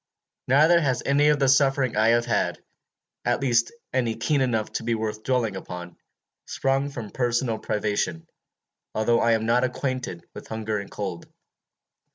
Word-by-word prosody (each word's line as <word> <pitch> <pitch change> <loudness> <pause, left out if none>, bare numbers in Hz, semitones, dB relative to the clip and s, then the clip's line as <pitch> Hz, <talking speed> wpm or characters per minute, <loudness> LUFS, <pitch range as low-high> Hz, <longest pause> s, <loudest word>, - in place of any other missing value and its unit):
Neither 155 +6 +5
has 130 -5 0
any 145 +2 +3
of 150 0 +4
the 135 -1 +2
suffering 135 -2 +3
I 110 +1 +3
have 120 +1 +3
had 120 - 0 0.7
at - - +1
least 120 -3 +2 0.2
any 120 -4 0
keen 140 +5 0
enough 115 -4 0
to - - -3
be 115 0 0
worth 110 -1 -3
dwelling 120 -5 0
upon 90 -2 -8 0.5
sprung 135 +1 0
from 120 -7 -7
personal 120 -2 0
privation, 105 -6 -2 0.7
although 115 +2 +2
I 115 0 +3
am 110 0 0
not 120 +2 +3
unacquainted 130 -8 -3
with - - -10
hunger 110 -1 -3
and 100 - -8
cold. 95 -5 -5
120 Hz, 160 wpm, -25 LUFS, 110-135 Hz, 0.7 s, Neither